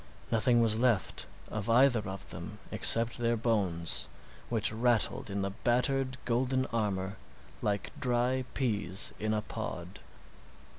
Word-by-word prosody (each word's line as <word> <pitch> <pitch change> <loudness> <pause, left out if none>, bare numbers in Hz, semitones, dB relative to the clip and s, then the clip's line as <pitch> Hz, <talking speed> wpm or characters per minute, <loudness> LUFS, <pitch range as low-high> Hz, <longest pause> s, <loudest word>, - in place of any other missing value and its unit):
Nothing 120 +1 +3
was 110 -1 +2
left 120 -7 +1 0.2
of 110 0 -4
either 125 +1 +5
of 95 0 -7
them - - -8
except 115 +1 +6
their 120 0 +1
bones, 85 - 0 0.4
which 110 -1 +3
rattled 115 -1 +1
in 100 0 -2
the 100 - -2
battered, 130 +4 0
golden 130 +2 0
armor 100 -4 -2 0.4
like 100 -1 -2
dry 125 +1 +1
peas 105 -7 -1
in 110 0 -1
a 105 -1 -1
pod. 90 -8 -6
115 Hz, 130 wpm, -30 LUFS, 100-120 Hz, 0.4 s, except